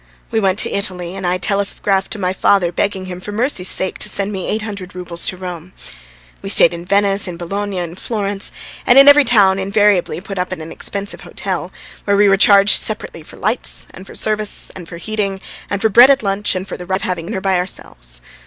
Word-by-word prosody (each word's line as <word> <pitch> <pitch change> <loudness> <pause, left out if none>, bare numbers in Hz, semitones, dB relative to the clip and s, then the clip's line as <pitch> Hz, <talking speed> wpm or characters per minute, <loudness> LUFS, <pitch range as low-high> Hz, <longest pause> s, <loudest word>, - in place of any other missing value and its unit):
We 225 - +1
went 195 -2 +1
to - - +2
Italy, 180 -2 -3
and 190 -2 -3
I 180 +1 +1
telegraphed 195 0 -1
to - - -6
my 185 -2 -1
father 190 -2 +2
begging 190 +1 -2
him 180 -1 -7
for 205 - -6
mercy's 215 -4 0
sake 190 - -2
to - - -1
send 200 +1 +2
me 190 -3 -4
eight 215 0 -1
hundred 200 -4 -7
roubles 175 -2 -2
to 185 - -2
Rome. 180 -1 -8 0.7
We - - -6
stayed - - +5
in 170 0 -7
Venice, 200 +1 +2
in 175 -2 -6
Bologna, 195 +3 -4
in 170 -2 -4
Florence, 205 0 -3 0.4
and 245 - +6
in 275 +1 +9
every 285 0 +8
town 200 -6 +4
invariably 200 -2 +1
put 195 +1 -7
up 180 - -2
at 185 - -3
an 160 +1 -8
expensive 200 0 -3
hotel, - - -4 0.3
where 200 -1 +2
we 205 0 +5
were 195 - +5
charged 200 0 +5
separately - - -2
for - - -14
lights, - - -2
and 190 - -12
for - - -12
service, 215 -1 -2
and 175 -3 -9
for 170 - -8
heating, 200 +1 -3 0.3
and 200 +1 -3
for 220 - +4
bread 240 +5 +8
at 275 -4 +3
lunch, 195 0 0
and 185 +1 -4
for - - -6
the 180 - -9
right 190 - 0
of - - -4
having 175 -2 -3
dinner 205 -2 -3
by 190 -1 +1
ourselves. - - -5
195 Hz, 225 wpm, -17 LUFS, 180-205 Hz, 0.7 s, in